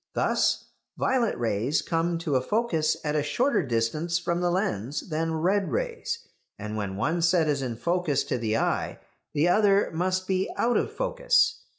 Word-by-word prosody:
Thus, - - +1 0.3
violet 250 -4 +1
rays 115 +5 0
come 165 +1 0
to 145 -4 +1
a 130 - +3
focus 175 - 0
at 150 -1 -1
a 150 - +2
shorter 245 - +1
distance 140 +6 0
from 175 0 -1
the 175 - +2
lens 145 - -2
than 160 +1 -1
red 190 +5 +1
rays, 470 -1 -3 0.3
and 105 +1 -5
when 100 -3 -3
one 160 +10 0
set 165 -1 +3
is 145 -2 0
in 125 -3 -3
focus 170 +1 0
to 125 - -2
the 110 -1 0
eye - - -1 0.4
the 150 +3 +3
other 200 +1 +3
must 185 +3 0
be 190 0 0
out 240 +1 +2
of - - +1
focus. - - +1
170 Hz, 175 wpm, -26 LUFS, 140-200 Hz, 0.4 s, a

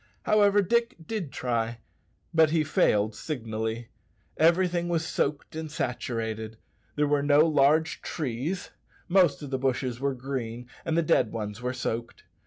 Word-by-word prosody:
However, 205 -1 +4
Dick 235 +4 +1
did 200 -9 -4
try, 115 -1 -1 0.6
but 160 -1 +5
he 160 0 +2
failed 110 -7 +2
signally. 110 -2 -4 0.5
Everything 175 +1 +3
was 165 -2 0
soaked 145 0 -2
and 160 0 -4
saturated. 115 -5 -3 0.4
There 150 - +2
were 145 0 +2
no 145 +1 +5
large 155 +1 +3
trees; 150 +5 -3 0.4
most 175 -7 +3
of 140 - -7
the 130 - -1
bushes 130 -2 -1
were 140 0 0
green, 125 -2 -5 0.2
and 165 0 0
the 170 - +3
dead 125 -6 +2
ones 105 0 -5
were 125 0 -1
soaked. 115 -2 -4
140 Hz, 145 wpm, -27 LUFS, 115-160 Hz, 0.6 s, but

